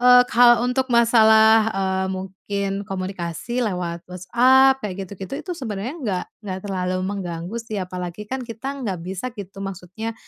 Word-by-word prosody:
eee, 250 0 +8
kalau 240 0 +6
untuk 260 +1 0
masalah, 225 -2 +6
eee, 190 -1 0
mungkin 195 +1 -4
komunikasi 190 +4 -3
lewat 175 -4 -3
WhatsApp 255 +9 +4
kayak 195 -1 -4
gitu-gitu, 195 +5 -7
itu 360 - -4
sebenernya 225 -1 -4
enggak 210 - -2 0.2
enggak 190 -3 -4
terlalu 185 -2 -1
mengganggu 185 0 -4
sih, 225 -2 -6
apalagi 180 +1 -5
kan 265 0 -3
kita 265 +4 -6
nggak 200 -6 -2
bisa 190 +7 -4
gitu, 195 -1 -9
maksudnya 195 +4 -6
200 Hz, 145 wpm, -22 LUFS, 185-235 Hz, 0.2 s, eee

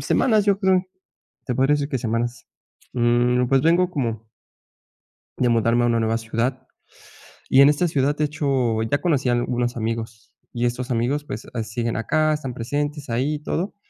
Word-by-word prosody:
semanas, 220 -5 +2
yo 200 -1 +3
creo, 190 -2 +3 0.6
te 125 - -1
podría 135 +3 +3
decir 145 0 -2
que 135 - -1
semanas, 115 0 -3 0.5
mm, 120 +1 +2
pues, 135 -1 +3
vengo 175 +4 +3
como 115 - -3 1.1
de 125 - +2
mudarme 115 +1 +2
a - - +3
una 115 -1 +2
nueva 115 0 +1
ciudad. 120 +3 -3 0.8
Y 135 - +6
en 140 - +8
esta 150 +4 +2
ciudad, 145 -2 +1
de 150 - +1
hecho, 135 -7 0
ya 125 +6 0
conocí 145 -7 +1
a - - +3
algunos 120 0 -1
amigos, 115 0 -5 0.2
y 120 0 -1
estos 125 +2 -2
amigos, 125 +5 0
pues, 110 - -7
ah, 115 -2 -2
siguen 115 +1 -3
acá, 155 +8 +1
están 135 -4 -4
presentes 145 +4 -3
ahí 130 +6 0
y - - -6
todo. 180 +6 -3
125 Hz, 175 wpm, -22 LUFS, 115-145 Hz, 1.1 s, en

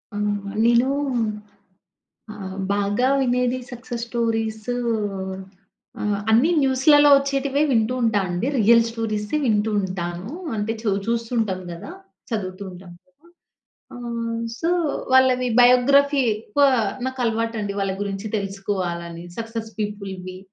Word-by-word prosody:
ఆ! - - -3 0.3
మళ్ళీనూ 235 +5 +3 1.4
ఆహ్, 190 -2 -7 0.2
బాగా 205 +5 +1
వినేది 250 0 +1
సక్సెస్ 240 -1 -6
స్టోరీస్ 225 -2 -2 1.6
అన్నీ 240 +10 +4
న్యూస్‌లలో 285 +2 +5
ఒచ్చేటివే 275 +1 0
వింటూ 225 0 +2
ఉంటా 220 -3 +2
అండి. 175 +8 -2
రియల్ 230 +2 +6
స్టోరీసే 220 +2 -2
వింటూ 215 -1 +1
ఉంటాను. 180 +1 -4 0.3
అంటే, 210 +1 -1
చు 215 - 0 0.2
చూస్తంటాం 230 -4 -1
గదా! 170 - -8 0.4
చదువుతూ 200 -4 -4
ఉంటాము 180 -1 -12
కదా! 280 +5 -27 0.7
ఆహ్, 235 -1 -4 0.2
సో, 335 +1 0 0.4
వాళ్ళవి 255 -1 +4
బయోగ్రఫీ 275 +3 +5
ఎక్కువ 225 +6 0 0.4
నాకలవాటండి 230 -5 -2
వాళ్ళ 195 -1 -1
గురించి 200 +1 -4
తెలుసుకోవాలని, 185 -4 -4
సక్సెస్ 225 -1 -5
పీపుల్‌వి. 195 -3 -5
225 Hz, 100 wpm, -22 LUFS, 200-250 Hz, 1.6 s, రియల్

